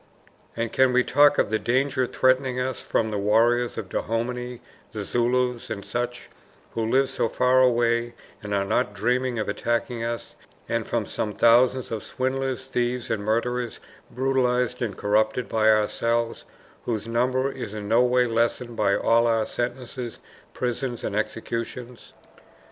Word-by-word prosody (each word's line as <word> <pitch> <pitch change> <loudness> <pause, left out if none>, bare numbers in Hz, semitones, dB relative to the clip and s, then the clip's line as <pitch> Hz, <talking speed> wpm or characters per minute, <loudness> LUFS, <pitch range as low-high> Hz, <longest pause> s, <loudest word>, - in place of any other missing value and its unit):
And 115 -1 -2
can 130 -1 +4
we 125 0 +4
talk 145 +3 +4
of - - +1
the 110 - +1
danger 130 +3 +1
threatening 130 0 +2
us 130 0 -2
from 110 -1 0
the 105 - -2
warriors 115 +4 +2
of 105 - -4
Dahomey, 125 +4 -3 0.3
the 105 -2 -4
Zulus, 125 +1 0
and 100 -3 -5
such, 120 0 -4 0.4
who 115 - -2
live 130 +5 +2
so 130 -3 -1
far 125 +2 +3
away 120 -1 +2 0.3
and 105 - -7
are 100 -1 +1
not 105 +1 0
dreaming 125 +4 0
of 110 - -2
attacking 120 0 -1
us, 115 0 -4 0.3
and - - -1
from - - -1
some 105 - -3
thousands 125 +3 +4
of 110 -2 -3
swindlers, 130 +1 -2
thieves, 125 -2 -2
and 110 -2 -1
murderers, 120 +2 -1 0.3
brutalized 125 -1 0
and 110 -5 -2
corrupted 110 +4 +1
by 110 -1 +2
ourselves, 115 +2 +1 0.4
whose 110 -3 -2
number 130 +3 +1
is 125 -6 -7
in 105 -1 -5
no 115 +3 +4
way 125 0 +3
lessened 115 +1 -1
by 100 -2 +2
all 115 +1 +3
our 115 -1 +2
sentences, 120 0 -4 0.4
prisons, 125 0 -3
and 100 - -3
executions? 115 +3 -4
120 Hz, 155 wpm, -25 LUFS, 115-125 Hz, 0.4 s, can